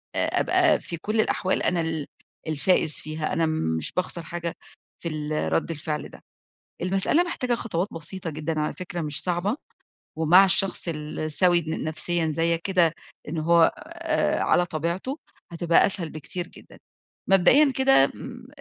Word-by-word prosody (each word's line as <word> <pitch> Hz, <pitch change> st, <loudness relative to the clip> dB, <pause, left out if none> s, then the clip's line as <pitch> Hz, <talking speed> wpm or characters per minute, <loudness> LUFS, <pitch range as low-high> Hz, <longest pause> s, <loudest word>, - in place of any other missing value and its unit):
آآ -, -, +1 dB
أبقى -, -, +3 dB
في 170 Hz, -, -6 dB
كل 215 Hz, +6 st, 0 dB
الأحوال 190 Hz, -3 st, 0 dB
أنا 175 Hz, -2 st, +1 dB
ال 160 Hz, -2 st, -3 dB, 0.4 s
الفائز 155 Hz, +1 st, +2 dB
فيها، 155 Hz, 0 st, -4 dB
أنا 165 Hz, -, +1 dB, 0.3 s
مش 80 Hz, -, -3 dB
باخسر 180 Hz, -2 st, -2 dB
حاجة 170 Hz, 0 st, -5 dB, 0.5 s
في 170 Hz, -, -2 dB
ال 150 Hz, -, -2 dB
رَد 80 Hz, -, 0 dB
الفعل 150 Hz, -1 st, -4 dB
ده. -, -, -15 dB, 0.6 s
المسألة 195 Hz, -, +2 dB
محتاجة 250 Hz, -8 st, -1 dB
خطوات 200 Hz, -5 st, -2 dB
بسيطة 165 Hz, +2 st, -6 dB
جدًا 155 Hz, +1 st, -3 dB
على 150 Hz, -, -1 dB
فكرة 175 Hz, -1 st, -6 dB
مش 150 Hz, -2 st, -1 dB
صعبة 185 Hz, +7 st, 0 dB, 0.6 s
ومع 165 Hz, +5 st, +6 dB
الشخص 195 Hz, -1 st, 0 dB
السَوِي 155 Hz, +3 st, +1 dB
ن 160 Hz, -, -3 dB
نفسيًا 165 Hz, +2 st, +1 dB
زيّك 165 Hz, +2 st, 0 dB
كده 180 Hz, -5 st, +2 dB, 0.4 s
إن 160 Hz, +2 st, -3 dB
هو 170 Hz, +2 st, +4 dB, 0.2 s
آآ 335 Hz, -1 st, -1 dB
على 175 Hz, -, +3 dB
طبيعته، 170 Hz, -, -3 dB, 0.3 s
هتبقى 170 Hz, 0 st, +3 dB
أسهل 180 Hz, -5 st, -1 dB
بكتير 170 Hz, +3 st, -5 dB
جدًا. -, -, -15 dB, 0.5 s
مبدئيًا 240 Hz, +10 st, +5 dB
كده 265 Hz, -, +5 dB
م 245 Hz, -1 st, -9 dB
170 Hz, 150 wpm, -25 LUFS, 155-190 Hz, 0.6 s, ومع